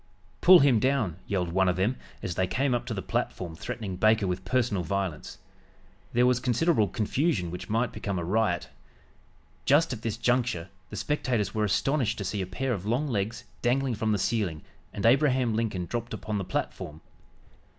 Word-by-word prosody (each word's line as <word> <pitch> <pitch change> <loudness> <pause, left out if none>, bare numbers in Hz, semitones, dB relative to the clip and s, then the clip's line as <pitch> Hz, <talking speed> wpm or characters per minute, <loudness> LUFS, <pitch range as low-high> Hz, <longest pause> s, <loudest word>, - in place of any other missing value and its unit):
"Pull 180 -1 +9
him 135 -5 +5
down!" 120 - +1
yelled 90 -4 -1
one 95 +1 +3
of 90 - +1
them 100 +8 +1 0.3
as 90 - -2
they 95 +2 0
came 130 +8 0
up 120 - -1
to - - -2
the - - -4
platform 85 -3 -2
threatening 110 -1 -5
Baker 110 +1 +4
with 90 0 -2
personal 120 -3 +1
violence. 95 -3 -3 0.7
There 120 +1 +3
was 125 -1 +3
considerable 125 -1 +2
confusion 105 - 0
which 90 - -7
might 115 +3 +1
become 100 -2 -3
a 85 - -2
riot. 90 - 0 0.9
Just 145 0 +4
at 115 - -7
this 115 -2 -2
juncture 120 -8 0 0.2
the - - -7
spectators 120 -9 -1
were 110 -1 +1
astonished 125 +4 +1
to 100 - -3
see 100 +2 -2
a 95 - -3
pair 125 +7 -2
of 100 -2 -5
long 125 +7 +1
legs 110 0 -2 0.2
dangling 130 +1 +1
from 110 0 -1
the 105 - +2
ceiling 95 -6 -1 0.3
and 100 - -4
Abraham 130 -1 +4
Lincoln 110 -5 -1
dropped 120 +4 -4
upon 105 -2 -3
the 95 - -3
platform. 75 -2 -4
110 Hz, 180 wpm, -28 LUFS, 95-125 Hz, 0.9 s, Pull